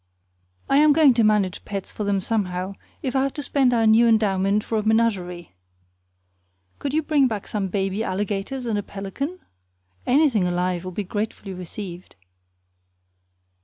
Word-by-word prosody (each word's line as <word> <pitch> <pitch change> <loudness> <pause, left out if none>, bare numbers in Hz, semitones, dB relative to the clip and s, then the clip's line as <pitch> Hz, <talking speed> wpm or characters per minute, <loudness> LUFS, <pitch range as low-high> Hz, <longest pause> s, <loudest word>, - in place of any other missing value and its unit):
I 275 - +3
am 300 0 +6
going 300 -3 +6
to 230 -1 +2
manage 210 -4 +1
pets 195 -2 -5
for 210 - -5
them 200 -1 +1
somehow, 185 -3 -2 0.3
if 260 0 -2
I 265 - +3
have 275 0 -1
to 290 - -4
spend 270 -3 +2
our 230 -2 +2
new 220 +2 +6
endowment 205 -2 +2
for 225 -1 -1
a - - -3
menagerie. 195 - 0 1.3
Couldn't 280 +1 -3
you 315 - +2
bring 290 -3 +3
back 215 -4 -4
some 205 -3 -2
baby 195 +2 -1
alligators 205 +6 -3
and 220 -3 0
a - - -1
pelican? 205 - -5 0.7
Anything 255 - +3
alive 180 0 -1
will 185 - -5
be 205 +3 -3
gratefully 205 0 -4
received. 180 0 -8
210 Hz, 160 wpm, -23 LUFS, 190-245 Hz, 1.3 s, am